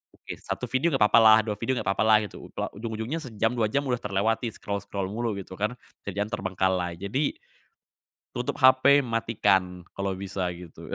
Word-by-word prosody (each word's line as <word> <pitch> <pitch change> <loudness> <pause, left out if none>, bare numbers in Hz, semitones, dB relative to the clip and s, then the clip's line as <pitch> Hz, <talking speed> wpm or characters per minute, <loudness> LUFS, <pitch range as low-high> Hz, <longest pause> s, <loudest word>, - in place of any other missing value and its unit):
oke - - -8
1 - - -4
video 130 +7 +2
gak 120 - +3
papalah, 110 0 +6
2 105 - -1
video 130 +3 -1
gak - - -6
papalah 110 0 +4
gitu, 105 - -9
loh - - -2
ujung-ujungnya 115 +6 -4
sejam, 115 -6 -1
2 110 -2 +1
jam 140 +3 +1
udah 125 -2 -1
terlewati 110 +3 0
scroll-scroll 100 -1 -4
mulu 115 -1 -2
gitu 95 -1 -9
kan, 105 +4 -1 0.3
kerjaan 100 +2 -3
terbengkalai. 95 -3 -1
Jadi, 130 +10 -1 1.0
tutup - - -3
HP, 130 +2 +6
matikan 100 -6 0
kalau 100 -1 -2
bisa 95 -1 -3
gitu, 85 -2 -11
110 Hz, 165 wpm, -26 LUFS, 100-120 Hz, 1.0 s, papalah